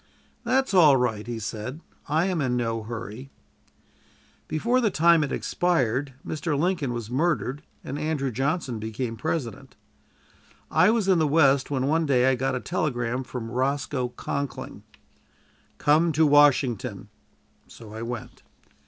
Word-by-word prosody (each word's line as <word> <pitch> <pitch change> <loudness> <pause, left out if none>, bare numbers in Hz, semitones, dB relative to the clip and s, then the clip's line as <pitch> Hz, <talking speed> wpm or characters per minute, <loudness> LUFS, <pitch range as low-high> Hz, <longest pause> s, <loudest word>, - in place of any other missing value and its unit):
"That's 260 0 +1
all 155 -7 +7
right," 115 -3 -1
he 120 -1 -4
said; 110 +6 -5 0.3
"I 160 +4 +2
am 185 -4 -1
in 125 -2 0
no 115 -2 -1
hurry." 115 +3 -7 1.2
Before 235 +11 +1
the 225 - +2
time 170 -2 +4
had 145 - -2
expired, 140 -6 0
Mr. 155 -1 -2
Lincoln 170 -4 0
was 120 -1 -5
murdered 145 -1 0 0.2
and 140 +2 -5
Andrew 150 -4 -1
Johnson 135 0 -2
became 115 +2 -4
President. 135 -4 -4 1.0
I 185 - +5
was 220 -3 +1
in 185 -3 +4
the 155 - +2
West, 140 -3 +3
when 135 -2 -1
one 160 +3 +1
day 130 -2 +3
I - - +2
got 130 +1 -1
a - - -1
telegram 125 -6 -2
from 120 -2 -6
Roscoe 130 0 -1
Conkling: 140 -1 -5 1.0
"Come 160 +3 +3
to 155 +2 +4
Washington." 140 -6 +3 0.6
So 110 -2 -13
I 110 - -6
went. 120 -1 -6
140 Hz, 145 wpm, -25 LUFS, 120-160 Hz, 1.2 s, all